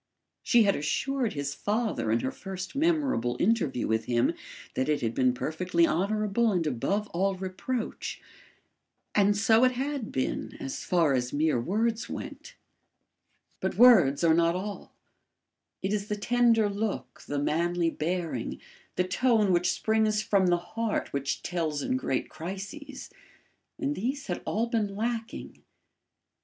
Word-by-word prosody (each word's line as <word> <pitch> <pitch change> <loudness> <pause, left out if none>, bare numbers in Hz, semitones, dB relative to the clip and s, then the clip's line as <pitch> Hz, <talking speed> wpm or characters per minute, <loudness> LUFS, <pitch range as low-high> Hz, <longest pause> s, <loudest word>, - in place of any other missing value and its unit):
She 240 -2 +4
had 200 -1 +3
assured 250 - -1
his 140 -1 -3
father 210 - -1
in 115 +1 +2
her 130 - -2
first 190 +1 -7
memorable 280 - +1
interview 180 - +1
with 110 0 0
him 120 -1 +2 0.4
that 130 +3 -1
it 150 - +1
had 115 -1 -1
been 130 0 +3
perfectly 170 +6 +1
honourable 210 +6 +1
and 175 -4 0
above 155 - -1
all 195 +3 0
reproach. 190 +6 -4 0.9
And 205 0 +3
so 220 +2 +4
it 255 0 +4
had 270 -2 -3
been 130 - -2
as 135 - -5
far 165 -5 +2
as 125 -1 0
mere 150 -4 +1
words 220 - -1
went. - - -7 1.0
But - - -2
words 175 - +6
are 165 -1 +5
not 170 +1 +3
all; 200 +2 -5 0.9
it 190 +2 0
is 205 -1 -2
the 210 - -1
tender 230 0 +3
look, 205 +1 -4
the 145 - -2
manly 170 +3 +1
bearing, 165 -7 -3 0.4
the 180 - +2
tone 215 -1 +3
which 175 +1 +2
springs 220 -1 +1
from 195 -3 +2
the 175 0 +4
heart 225 +5 -3
which 140 0 -2
tells 160 -5 -2
in 255 - 0
great 195 - -1
crises; 195 - -7 0.7
and 285 -1 -1
these 270 +6 -3
had - - -3
all 225 +3 0
been 220 -4 -1
lacking. 230 +1 -4
195 Hz, 145 wpm, -28 LUFS, 160-225 Hz, 1.0 s, words